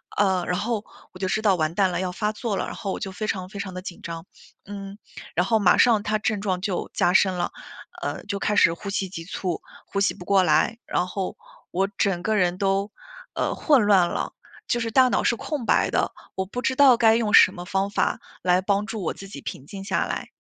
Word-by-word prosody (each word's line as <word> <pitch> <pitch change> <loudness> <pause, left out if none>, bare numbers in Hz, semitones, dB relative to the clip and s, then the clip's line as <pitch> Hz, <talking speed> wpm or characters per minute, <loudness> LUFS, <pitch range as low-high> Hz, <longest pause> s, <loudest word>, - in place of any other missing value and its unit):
呃， 190 -3 +2
然 180 +2 -1
后 220 -1 -2 0.3
我 - - -12
就 190 - -2
知 215 +3 0
道 200 -4 +4
“完 155 0 0
蛋 195 0 +3
了， - - -2
要 185 -1 -2
发 210 +3 -1
作 215 -1 -3
了”， - - -1
然 - - -6
后 195 - -4
我 - - -4
就 190 - -4
非 215 +3 -4
常 185 -3 -3
非 200 - -8
常 190 -2 -5
地 185 - -6
紧 180 -2 -8
张， 165 0 -6 0.4
嗯。 200 0 -8 0.4
然 180 - +3
后 225 +3 +3
马 195 -4 +4
上 225 -4 +4
它 215 -1 0
症 215 0 -1
状 185 -3 -1
就 195 -2 -2
加 175 - +2
深 190 0 +4
了， 175 -1 -2 0.5
呃， - - -4
就 200 -1 -3
开 210 +1 0
始 165 - +5
呼 200 +3 -6
吸 195 -2 -2
急 165 -3 -7
促、 180 -1 -3 0.3
呼 200 - -2
吸 200 - +2
不 180 - -11
过 195 0 +3
来。 155 +7 +2
然 180 - 0
后 190 0 -4 0.4
我 190 +2 +1
整 185 -3 +1
个 220 +3 0
人 180 -1 +1
都， 195 +1 0 0.4
呃， - - -1
混 285 -6 +4
乱 190 -4 +5
了， - - -3 0.3
就 240 - +1
是 230 -1 -2
大 260 +1 +6
脑 - - +1
是 235 - +2
空 285 0 -4
白 - - +3
的， - - 0 0.2
我 190 - -1
不 245 +6 -5
知 260 +2 0
道 270 -2 +7
该 225 -1 +5
用 225 -2 0
什 185 - +8
么 175 - -7
方 195 +2 0
法 200 - 0 0.2
来 180 0 +3
帮 200 +1 0
助 220 -2 -5
我 170 - -2
自 195 - -10
己 140 -8 -9
平 130 - -7
静 195 +5 -8
下 195 - 0
来。 - - -4
195 Hz, 260 characters per minute, -24 LUFS, 180-215 Hz, 0.5 s, 什